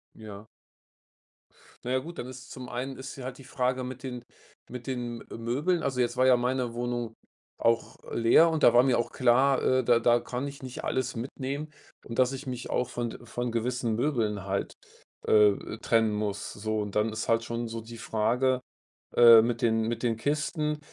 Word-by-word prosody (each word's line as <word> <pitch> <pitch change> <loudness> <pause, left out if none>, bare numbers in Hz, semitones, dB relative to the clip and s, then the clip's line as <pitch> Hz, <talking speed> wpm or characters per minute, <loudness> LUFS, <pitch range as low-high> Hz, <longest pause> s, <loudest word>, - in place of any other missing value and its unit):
Ja. 105 -1 -10 1.4
Na 125 - -2
ja 130 - +2
gut, 170 +5 -9
dann 125 - -5
ist's 130 0 -10
zum 125 -1 -8
einen 130 +2 -4
ist 135 +1 -8
ja 130 - -7
halt 130 0 -6
die 135 - -13
Frage 130 0 -1
mit 130 +1 -7
den 125 -2 -6 0.5
mit 125 +1 -8
den, 120 -2 -4
äh, - - -8
Möbeln, 145 +9 0
also 130 -2 -1
jetzt 120 0 +1
war 130 - +3
ja 130 -1 +6
meine 125 -1 -1
Wohnung 120 -1 -3 0.4
auch 115 0 +1 0.2
leer 120 +9 +5
und 160 -1 -1
da - - +7
war 120 - +7
mir 130 -2 +3
auch 120 - -2
klar, 130 +2 +3
äh, 130 0 +2
da 120 -1 +4
da 120 0 +3
kann 125 +3 -4
ich 140 -1 -9
nicht 130 -1 -7
alles 130 -2 -1
mitnehmen 135 +4 -4 0.4
und 115 - -5
dass 130 0 +4
ich 135 +1 -7
mich 125 -1 -5
auch 125 - 0
von 120 0 -5
von 120 +1 -3
gewissen 120 -1 -1
Möbeln 110 -7 -1
halt, 100 0 -2 0.5
äh, 105 +1 +3
trennen 115 -2 +2
muss, 105 -1 -3
so. 110 +1 -2
Und, 105 -1 -4
dann 105 +1 +2
ist 110 +1 -4
halt 115 0 +2
schon 115 0 -3
so 115 0 -5
die 115 +1 -10
Frage, 125 +4 +1 0.6
äh, 115 -2 +9
mit 120 +1 -1
den 115 -1 +2
mit 115 +2 -2
den 115 -2 +1
Kisten, 150 +3 -1
120 Hz, 200 wpm, -28 LUFS, 115-130 Hz, 1.4 s, äh